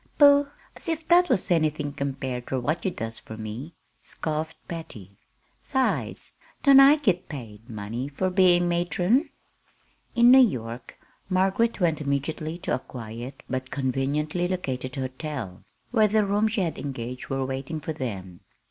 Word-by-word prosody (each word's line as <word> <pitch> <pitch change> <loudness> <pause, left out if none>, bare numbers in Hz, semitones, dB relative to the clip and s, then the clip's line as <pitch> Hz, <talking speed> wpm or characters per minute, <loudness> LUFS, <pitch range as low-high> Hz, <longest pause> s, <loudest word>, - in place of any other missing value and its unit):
"Pooh! 285 -1 +7 0.3
As - - -5
if 320 -1 -2
that 355 +1 +6
was 185 - +1
anything 155 -3 +1
compared 135 -3 -4
ter 130 - -1
what 155 +7 -1
you - - +3
does 115 -9 -5
fur 110 - -10
me," 115 +9 -7 0.3
scoffed 155 +1 -4
Patty. 110 - -7 0.5
"'Sides, 265 -1 -1 0.3
don't 275 -1 +8
I 275 +2 +9
git 195 - 0
pay 115 -8 -8
money, 115 +3 -5
fur 185 +6 -1
bein' 180 -2 +4
matron?" 175 - +1 0.9
In 240 +1 +7
New 265 - +9
York 120 - 0 0.3
Margaret 195 +5 +2
went 165 -5 +1
immediately 155 +3 -2
to 185 - -2
a - - +1
quiet, 120 +3 -8
but 130 0 -3
conveniently 140 +6 -1
located 130 -8 -3
hotel, 130 - -5 0.3
where 220 -3 +4
the 210 0 +2
rooms 210 +2 +1
she 220 - +1
had 170 -3 -2
engaged 125 -2 -5
were 135 0 -1
waiting 135 +4 -4
for 160 - -4
them. 95 - -6
150 Hz, 150 wpm, -26 LUFS, 130-185 Hz, 0.9 s, I